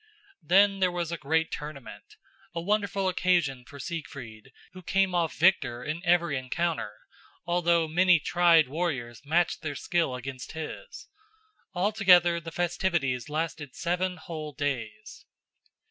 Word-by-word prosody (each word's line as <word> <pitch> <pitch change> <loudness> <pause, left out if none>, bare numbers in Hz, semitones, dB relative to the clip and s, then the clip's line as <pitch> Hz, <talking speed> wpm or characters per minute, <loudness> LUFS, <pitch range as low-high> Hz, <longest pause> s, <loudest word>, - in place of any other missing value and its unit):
Then 195 +2 +4
there 185 -1 +3
was 175 -2 -3
a - - -1
great 160 +2 0
tournament, 150 - -8 0.4
a - - -1
wonderful 200 +1 0
occasion 175 -8 +1
for 145 -2 -12
Siegfried, 130 - -7 0.2
who 185 - -10
came 195 +1 +1
off 170 -2 0
victor 150 -9 +2
in 155 +2 -4
every 170 -5 +2
encounter, 160 -1 -2 0.6
although 170 -1 +2
many 180 +2 +4
tried 170 -2 +4
warriors 135 -7 -3
matched 170 +5 +1
their 150 -3 -4
skill 165 -4 0
against 130 0 -7
his. 160 - -8 0.7
Altogether 180 -3 +4
the 165 0 -8
festivities 170 -7 -1
lasted 155 -3 -4
seven 180 +1 -1
whole 155 -2 -7
days. 130 -7 -5
165 Hz, 130 wpm, -28 LUFS, 145-180 Hz, 0.7 s, Then